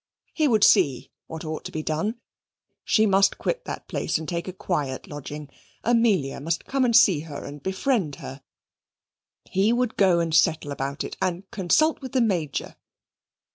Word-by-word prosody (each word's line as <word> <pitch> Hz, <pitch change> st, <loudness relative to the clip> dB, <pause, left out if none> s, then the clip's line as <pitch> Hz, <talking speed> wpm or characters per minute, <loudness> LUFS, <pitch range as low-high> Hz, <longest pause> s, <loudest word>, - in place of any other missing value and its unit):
He 310 Hz, -2 st, +2 dB
would 220 Hz, -6 st, +3 dB
see 130 Hz, -4 st, +4 dB, 0.2 s
what 160 Hz, 0 st, -7 dB
ought 155 Hz, 0 st, -5 dB
to -, -, -6 dB
be 155 Hz, -, -4 dB
done. 165 Hz, +11 st, -2 dB, 0.6 s
She 220 Hz, -, +3 dB
must 195 Hz, -1 st, +3 dB
quit -, -, -2 dB
that -, -, -6 dB
place -, -, -1 dB
and 160 Hz, 0 st, -7 dB
take 170 Hz, 0 st, -3 dB
a -, -, -3 dB
quiet 145 Hz, -8 st, -3 dB
lodging. 145 Hz, 0 st, -8 dB, 0.4 s
Amelia 225 Hz, -, +2 dB
must 165 Hz, +3 st, -2 dB
come 270 Hz, -1 st, 0 dB
and 235 Hz, -2 st, +2 dB
see 195 Hz, -9 st, +6 dB
her 150 Hz, -2 st, -8 dB
and 145 Hz, 0 st, -9 dB
befriend 190 Hz, -, -1 dB
her. 135 Hz, +1 st, -9 dB, 1.0 s
He 195 Hz, +4 st, +1 dB
would 240 Hz, -1 st, 0 dB
go 185 Hz, -3 st, +4 dB
and 165 Hz, -1 st, -1 dB
settle 160 Hz, -2 st, +2 dB
about 140 Hz, 0 st, -3 dB
it, -, -, -7 dB
and 180 Hz, 0 st, -1 dB
consult 295 Hz, -, +2 dB
with 260 Hz, -2 st, -8 dB
the 260 Hz, -, +2 dB
Major. 175 Hz, -, -1 dB
175 Hz, 175 wpm, -25 LUFS, 150-220 Hz, 1.0 s, see